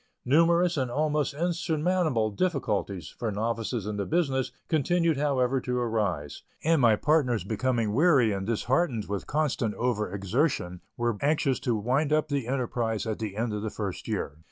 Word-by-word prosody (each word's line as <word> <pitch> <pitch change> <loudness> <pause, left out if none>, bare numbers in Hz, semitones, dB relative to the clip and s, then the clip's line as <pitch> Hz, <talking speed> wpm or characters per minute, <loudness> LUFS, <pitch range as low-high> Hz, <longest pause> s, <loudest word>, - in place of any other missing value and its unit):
Numerous 170 +5 +4
and 130 -2 0
almost 150 +2 0
insurmountable 165 -6 0
difficulties, 105 - -1
for 115 +6 -4
novices 115 +1 -2
in 105 0 -3
the 100 - -1
business, 135 -6 0 0.2
continued 165 +1 +2
however 135 -3 +1
to 125 0 -2
arise, 100 -12 -1 0.2
and 160 -2 +3
my 115 -3 +5
partners 125 - +2
becoming 115 +1 0
weary 135 -5 +4
and 95 -1 -3
disheartened 120 +1 0
with 100 -1 -4
constant 140 -7 0
over 110 -5 -1
exertion, 100 - -1 0.2
were 120 -2 0
anxious 140 -2 +1
to 120 - 0
wind 130 +8 0
up 155 0 +2
the 140 -5 -1
enterprise 120 -4 -1
at 110 -2 -3
the 105 -3 -4
end 115 -1 -1
of 105 - -3
the 110 - -2
first 100 -4 -5
year. 70 - -3
125 Hz, 160 wpm, -27 LUFS, 110-150 Hz, 0.2 s, my